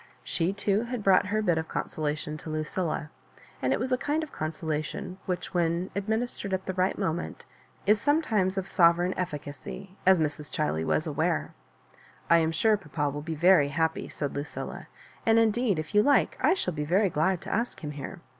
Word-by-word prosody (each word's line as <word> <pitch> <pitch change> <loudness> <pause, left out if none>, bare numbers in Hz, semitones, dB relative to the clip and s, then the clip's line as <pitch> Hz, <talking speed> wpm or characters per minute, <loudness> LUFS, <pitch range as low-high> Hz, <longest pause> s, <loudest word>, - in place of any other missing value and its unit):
She 170 +2 0
too 200 +1 +1
had 240 -3 -4
brought 190 -1 +5
her 215 +2 0
bit 175 -5 +2
of 160 - -4
consolation 150 0 -3
to 155 - -9
Lucilla; 155 0 -2 0.5
and 130 - +1
it - - +2
was 255 +3 -2
a 255 - +2
kind 300 +3 0
of 310 - -8
consolation 155 +3 -4
whicTi, 180 -1 -1
when 170 +1 0
administered 215 -1 -1
at 190 - -6
the 190 - -2
right 185 +1 +1
moment, 175 -4 -3 0.4
is 210 +1 +4
sometimes 220 - +2
of 190 0 -2
sovereign 175 -1 +4
efficacy, 180 +3 -6
as 190 0 +6
Mra 155 -2 +2 0.2
ChUey 80 - 0
was - - +1
aware. - - -1 0.8
"I 170 - +8
am 160 0 +1
sure 215 +7 +3
papa 150 -5 -2
will 145 +1 -5
be 160 +1 -4
very 170 -2 +5
happy," 160 +3 -1
said 145 -2 -4
Lucilla; 145 +2 -5 0.4
"and 225 0 +4
indeed, 225 -2 +3
if 155 -1 -5
you 210 - +6
like, 285 +5 +3
I - - +4
shall 180 - -2
be 150 -1 -2
very 185 +5 +2
glad 170 +5 +1
to - - -4
ask 230 -4 -2
him 150 - -3
here. 150 +5 -7
180 Hz, 190 wpm, -28 LUFS, 155-205 Hz, 0.8 s, I